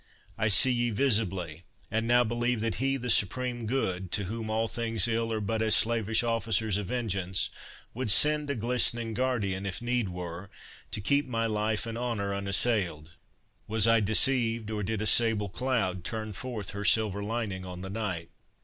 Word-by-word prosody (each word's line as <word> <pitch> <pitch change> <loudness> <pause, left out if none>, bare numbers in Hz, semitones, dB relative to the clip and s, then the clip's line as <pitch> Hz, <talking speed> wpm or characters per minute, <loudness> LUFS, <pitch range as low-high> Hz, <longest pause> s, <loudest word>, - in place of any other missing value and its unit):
I 105 - +1
see 110 +6 +4
ye 120 -1 +1
visibly, 95 - 0 0.3
and 110 +2 0
now 120 +1 +5
believe 120 +1 0
That 115 -1 -1
he 135 0 +2
the 125 -1 -5
Supreme 120 +2 +1
Good, 95 -8 -1
to 100 - 0
whom 110 +3 -5
all 110 +1 0
things 115 -3 +1
ill 115 0 0
Are 110 - -1
but 110 +2 -1
as 110 -1 +4
slavish 115 -1 +2
officers 110 -3 +1
of 105 -3 -4
vengeance, 95 -6 -1 0.4
Would 125 -1 -3
send 150 +7 +2
a 140 - 0
glistering 115 -1 0
guardian, 105 -6 -1
if 100 -1 -3
need 120 -3 0
were, 90 +1 -6 0.4
To - - -1
keep 140 +7 +3
my 115 -2 -1
life 110 0 0
and 115 0 -5
honour 110 -5 -2
unassail'd.— 100 -5 0 0.6
Was 110 0 +2
I 115 0 +6
deceived, 115 +1 +1
or 105 -1 -2
did 105 +1 -2
a - - -2
sable 110 -3 +3
cloud. 100 -6 -1
Turn 110 -1 -4
forth 110 -3 -5
her 100 +1 -5
silver 105 -1 +3
lining 105 -4 -3
on 90 -1 -7
the 95 - -6
night? 100 -6 -4
110 Hz, 175 wpm, -29 LUFS, 100-120 Hz, 0.6 s, I